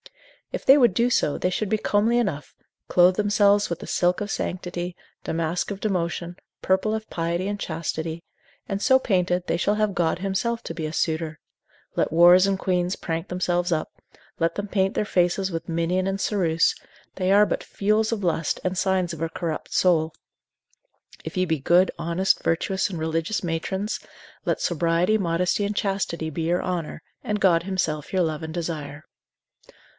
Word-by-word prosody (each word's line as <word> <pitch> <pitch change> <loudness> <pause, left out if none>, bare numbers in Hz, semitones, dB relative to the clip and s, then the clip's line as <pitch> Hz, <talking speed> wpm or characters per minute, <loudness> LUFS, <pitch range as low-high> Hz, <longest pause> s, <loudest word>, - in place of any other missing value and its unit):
If - - -5
they 270 - +8
would 240 -9 +4
do 235 +4 +3
so, 150 - +1
they 180 - 0
should 205 +2 -2
be 220 - +2
comely 215 +3 +2
enough, 170 - -2 0.3
clothe 180 +1 +5
themselves 205 0 +3
with 170 - -3
the - - -9
silk 180 0 +1
of 205 -1 -4
sanctity, 175 -1 -4 0.3
damask 165 +2 -1
of 195 - -5
devotion, 175 -3 -2 0.3
purple 190 +3 +1
of 220 0 -6
piety 170 +2 -2
and 205 0 -2
chastity, 160 0 -4 0.4
and 195 0 -3
so 260 +3 +5
painted, 180 -6 0
they - - +1
shall 200 +4 +1
have 215 -1 +1
God 170 -2 0
himself 200 +5 -1
to - - -5
be 160 -1 -4
a - - -5
suitor: 160 -1 -2 0.6
let - - +1
whores 175 +3 +6
and 195 -1 +1
queans 180 -1 0
prank 165 -1 -3
up - - -38
themselves, 175 -1 0 0.7
let 165 0 +1
them 205 0 -3
paint 195 -1 0
their - - 0
faces 185 0 +1
with 165 0 -5
minion 170 +3 0
and 195 0 -2
ceruse, 170 -6 +2 0.4
they 185 0 0
are 205 +1 +6
but - - -2
fuels 215 +2 0
of 215 -3 -2
lust, 165 -3 0
and 185 0 -1
signs 185 -2 +1
of 165 - -8
a 165 - -1
corrupt 160 -1 -4
soul: 160 -3 +2 1.1
if 160 - -7
ye 185 - +2
be 160 -3 -1
good, 175 +7 +4
honest, 175 +3 +1
virtuous, 190 +4 0
and 175 -4 -5
religious 160 +5 -1
matrons, 190 +5 -2 0.5
let - - 0
sobriety, 170 +5 +1
modesty 180 +1 0
and 205 +1 -2
chastity 190 -5 -1
be 160 +2 -4
your 170 +2 0
honour, 170 -4 -4 0.2
and 210 0 -1
God 170 -4 +4
himself 160 -6 -2
your 185 -2 +2
love 155 -2 -2
and 160 0 -5
desire. 155 -3 -5
180 Hz, 180 wpm, -24 LUFS, 165-195 Hz, 1.1 s, they